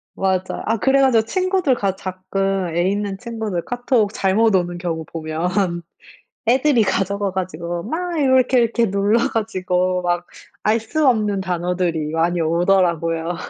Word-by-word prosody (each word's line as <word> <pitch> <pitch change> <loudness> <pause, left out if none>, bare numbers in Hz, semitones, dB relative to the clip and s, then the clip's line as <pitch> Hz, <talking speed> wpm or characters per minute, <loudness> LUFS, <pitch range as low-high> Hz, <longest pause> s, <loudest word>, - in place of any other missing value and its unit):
맞아. 190 -1 -1
아 225 +1 +1
그래 270 +4 +3
가지고 245 -5 +4
친구들 370 - +1
가 195 -5 -1
가끔 190 -1 -2
애 175 +2 +2
있는 200 -1 -2
친구들 220 -6 -4
카톡 245 -4 0
잘못 205 +3 +2
오는 175 -1 0
경우 165 -3 -4
보면 170 +3 -2 0.7
애들이 255 -1 +4
가져가 200 0 -1
가지고 175 -2 -4
막 340 - -3
이러 265 -3 +3
이렇게 255 0 +3
이렇게 230 -2 +1
눌러 200 +3 +2
가지고 185 -4 -1
막 175 0 -1 0.4
알 220 +2 +3
수 295 +7 -1
없는 210 -5 +2
단어들이 175 -3 -1
많이 170 +2 0
오더라고요. 170 -1 +1
195 Hz, 305 characters per minute, -20 LUFS, 175-225 Hz, 0.7 s, 가지고